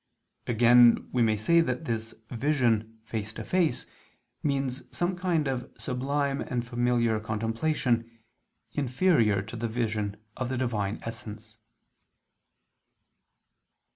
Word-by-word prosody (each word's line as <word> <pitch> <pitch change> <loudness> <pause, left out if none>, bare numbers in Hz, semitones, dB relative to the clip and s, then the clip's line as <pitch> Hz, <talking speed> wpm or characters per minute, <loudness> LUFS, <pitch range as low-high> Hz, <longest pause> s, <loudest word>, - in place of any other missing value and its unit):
Again 120 0 +6
we 125 - +1
may 110 -2 +3
say 170 +11 +4
that 160 0 -2
this 115 -3 -3 0.2
vision 115 -4 +1
"face 110 -1 -4
to - - -6
face" 175 -8 +1 0.6
means 135 -3 -1
some 175 +1 -1
kind 175 -5 0
of 130 -2 -3
sublime 140 +2 -1
and 120 -1 -2
familiar 120 -2 +1
contemplation, 115 +3 0 0.6
inferior 125 - +2
to 110 +3 -9
the 115 0 -2
vision 110 -3 -2 0.2
of 130 -2 -3
the 130 - -2
Divine 110 -5 -1
Essence. 110 -1 -8
120 Hz, 110 wpm, -28 LUFS, 110-135 Hz, 0.6 s, Again